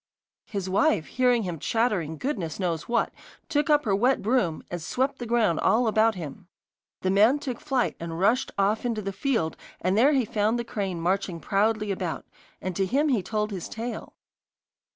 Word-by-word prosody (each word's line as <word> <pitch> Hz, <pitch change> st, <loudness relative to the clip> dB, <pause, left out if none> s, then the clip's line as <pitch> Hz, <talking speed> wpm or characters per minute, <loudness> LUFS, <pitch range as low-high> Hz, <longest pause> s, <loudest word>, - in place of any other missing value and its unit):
His 200 Hz, -3 st, -4 dB
wife, 195 Hz, -, +2 dB
hearing 250 Hz, -3 st, +2 dB
him 175 Hz, -4 st, -4 dB
chattering 190 Hz, -, 0 dB
goodness 190 Hz, -, -3 dB
knows 170 Hz, -2 st, -2 dB
what, 240 Hz, -, +1 dB, 0.4 s
took 300 Hz, -1 st, +1 dB
up 295 Hz, -2 st, +4 dB
her 200 Hz, -3 st, +2 dB
wet 250 Hz, +6 st, +2 dB
broom 210 Hz, -8 st, +1 dB
and 175 Hz, -1 st, -4 dB
swept 260 Hz, -, -1 dB
the 240 Hz, -, -5 dB
ground 225 Hz, -8 st, +2 dB
all 240 Hz, +3 st, +3 dB
about 220 Hz, 0 st, +3 dB
him. 160 Hz, -3 st, -8 dB, 0.5 s
The 185 Hz, -, +1 dB
man 215 Hz, +8 st, +5 dB
took 265 Hz, -5 st, -5 dB
flight 270 Hz, -5 st, 0 dB
and 165 Hz, 0 st, -5 dB
rushed 225 Hz, +7 st, +2 dB
oft 200 Hz, +2 st, +2 dB
into 230 Hz, -3 st, -2 dB
the 195 Hz, 0 st, -3 dB
field, 225 Hz, -, 0 dB, 0.2 s
and 185 Hz, +1 st, +1 dB
there 265 Hz, +8 st, +5 dB
he 265 Hz, -4 st, +2 dB
found 220 Hz, 0 st, +1 dB
the 235 Hz, -, -2 dB
crane 195 Hz, -7 st, -3 dB
marching 185 Hz, 0 st, -1 dB
proudly 210 Hz, +3 st, +1 dB
about, 185 Hz, -3 st, -3 dB, 0.3 s
and 185 Hz, -1 st, -4 dB
to 195 Hz, -1 st, +1 dB
him 285 Hz, +8 st, +2 dB
he 240 Hz, -7 st, +2 dB
told 210 Hz, +2 st, -2 dB
his 185 Hz, -4 st, -5 dB
tale. 230 Hz, 0 st, -6 dB
215 Hz, 185 wpm, -26 LUFS, 185-245 Hz, 0.5 s, man